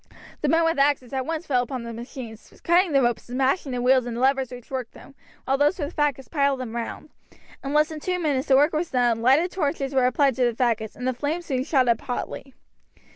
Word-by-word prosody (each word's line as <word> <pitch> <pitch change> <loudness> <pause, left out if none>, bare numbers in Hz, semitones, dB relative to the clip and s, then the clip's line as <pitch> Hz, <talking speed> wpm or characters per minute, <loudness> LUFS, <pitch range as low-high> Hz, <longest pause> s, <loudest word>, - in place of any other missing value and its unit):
The - - 0
men 330 0 +3
with 325 -3 +1
axes 275 -3 +1
at 260 -1 -2
once 325 +1 -3
fell 255 -3 +2
upon 250 0 -5
the 235 0 -6
machines, 235 -1 -10
cutting 350 +1 +3
the 275 -2 +3
ropes 240 0 -1
and 250 - -4
smashing 270 +2 +1
the 245 -1 -2
wheels 255 -1 +3
and 235 0 -4
levers 265 0 +2
which 245 0 -11
worked 255 -3 -4
them, - - -15 0.3
while 270 +1 +1
those 295 +5 +3
with 295 -1 -4
the 300 - -1
faggots 280 -3 0
piled 280 -3 +1
them 240 -3 -6
round. 235 -1 -6 0.5
In 275 - -4
less 300 +2 +3
than 315 -1 -6
two 360 +4 -2
minutes 290 -6 -1
the 270 - +5
work 295 +4 +4
was 315 +2 -1
done, 240 -3 +1
lighted 280 +9 +3
torches 285 -5 -2
were 260 -2 +3
applied 270 +2 +2
to 255 - +3
the 240 - +1
faggots, 225 -4 0
and 250 - -4
the 255 - +1
flames 300 +7 -3
soon 260 -5 -1
shot 265 -3 +2
up 230 -2 +2
hotly. 260 +1 -5
265 Hz, 240 wpm, -24 LUFS, 245-295 Hz, 0.5 s, the